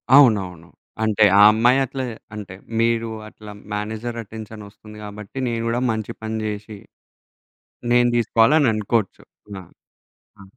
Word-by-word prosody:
అవునవును. 95 - +4 0.4
అంటే 110 -1 +2 0.2
ఆ - - +8
అమ్మాయి 120 +4 +3
అట్లా 130 +1 -5 0.3
అంటే, 100 -3 -8 0.3
మీరు 115 0 +1 0.2
అట్లా 105 -1 -12 0.2
మేనేజర్ 110 +3 -4
అటెన్‌షన్ 110 0 -10
ఒస్తుంది 105 +1 -15
గాబట్టి, 105 +3 -10
నేను 115 -1 -2
గూడా 120 +2 -1
మంచి 110 -2 -4
పని 110 0 -4
జేసి, 105 0 -6 1.2
నేను 120 0 +4
దీసుకోవాలననుకోచ్చు. 115 - +2 0.4
ఆ! - - -11 0.8
ఆ! - - -11
110 Hz, 120 wpm, -21 LUFS, 105-115 Hz, 1.2 s, ఆ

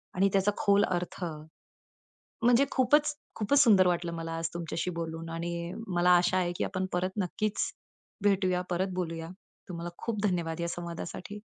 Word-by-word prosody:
आणि 195 +2 +4
त्याचा 195 +1 +3
खोल 200 0 +4
अर्थ, 180 +1 -3 1.2
म्हणजे 245 +3 +5
खूपच, 295 +4 +3 0.2
खूपच 225 +7 +3
सुंदर 195 -6 +6
वाटलं 175 -1 0
मला 165 0 -4
आज 165 0 -1
तुमच्याशी 170 +1 -2
बोलून 165 -1 -5
आणि 170 +1 -3 0.2
मला 175 +1 +4
आशा 175 +1 +2
आहे, 175 -1 0
की - - 0
आपण 185 -1 -2
परत 180 +1 0
नक्कीच 205 +3 -1 0.6
भेटूया, 185 -3 +2
परत 185 +2 0
बोलूया. 165 -2 -3 0.4
तुम्हाला 175 -1 -5
खूप 220 -3 -3
धन्यवाद 170 -3 -1
या 170 - -1
संवादासाठी. 175 +4 -6
180 Hz, 150 wpm, -29 LUFS, 170-200 Hz, 1.2 s, सुंदर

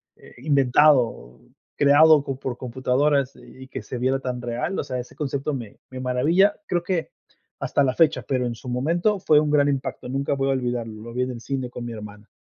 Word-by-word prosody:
eh, - - -17
inventado, 130 - +2 0.3
creado 145 +1 +6
por 130 -2 -4
computadoras. 130 +2 0
Y 130 - -14
y 130 - -12
que - - -6
se 125 - -6
viera 130 +2 0
tan 125 -1 -4
real, 120 +10 -3
o - - -2
sea 125 -1 -4
ese 125 - -9
concepto 140 0 -2
me 120 -6 -7
me 130 0 -8
maravilla, 155 +11 +2
creo 175 - 0
que 175 -2 -2 0.5
hasta - - 0
la 130 -1 +1
fecha, 160 -2 +3
pero 130 -2 0
en 120 -1 -3
su 125 - -12
momento 170 - 0
fue 155 -4 +4
un 150 0 0
gran 145 -1 +3
impacto, 135 -2 -3
nunca 135 +2 -1
voy 135 0 0
a - - +3
olvidarlo, 120 -4 -3
lo 115 +1 -9
vi 125 - -1
en 130 - -3
el 120 - -7
cine 130 -1 -3
con 120 -1 -7
mi 120 - -5
hermana. 105 0 -10
130 Hz, 215 wpm, -23 LUFS, 125-145 Hz, 0.5 s, creado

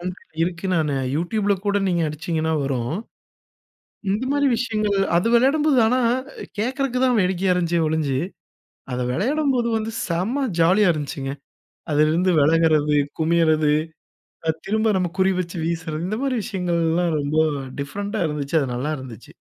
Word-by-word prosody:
ஒண்ணு 180 +1 -4 0.3
இருக்கு 175 +2 -2
நானு 150 -3 +1 0.2
யூடியூப்ல 200 +5 0
கூட 205 0 +2
நீங்க 175 -2 +1
அடிச்சீங்கன்னா 160 +1 -2
வரும். 130 0 -2 1.2
இந்த 210 +6 0
மாதிரி 285 0 +2
விஷயங்கள் 215 -4 0 0.2
அது 175 +6 +3
விளையாடும்போது 275 +3 +3
ஆனா, 250 +3 +2 0.3
அ, - - -15 0.2
கேக்குறதுக்கு 255 +3 -1
தான் 250 -2 +3
வேடிக்கையா 185 0 +1
இருந்துச்சே 170 -1 +1
ஒளிஞ்சு, 150 -4 0 0.7
அத 125 - -2
விளையாடும்போது 255 - +1
வந்து 220 0 -3
செம்ம 215 +12 -1
ஜாலியா 185 +5 +5
இருந்துச்சுங்க. 140 -2 -4 0.6
அதிலிருந்து 155 +5 +3
விலகுறது, 155 -1 +3 0.2
குமியறது, 160 -2 +3 0.8
அ, - - +4 0.2
திரும்ப 220 +1 +1
நம்ம 180 -2 -1
குறி 190 +1 +4
வச்சு 175 0 -5
வீசுறது 165 0 -3
இந்த 215 +2 -2
மாதிரி 270 -2 0
விஷயங்கள்லாம் 170 -2 0
ரொம்ப 145 +2 -1 0.4
டிஃபரெண்டா 205 +9 -4
இருந்துச்சு. 150 +1 -2
அது 135 - -2
நல்லா 140 +6 -2
இருந்துச்சு. 125 -5 -11
175 Hz, 135 wpm, -22 LUFS, 155-215 Hz, 1.2 s, ஜாலியா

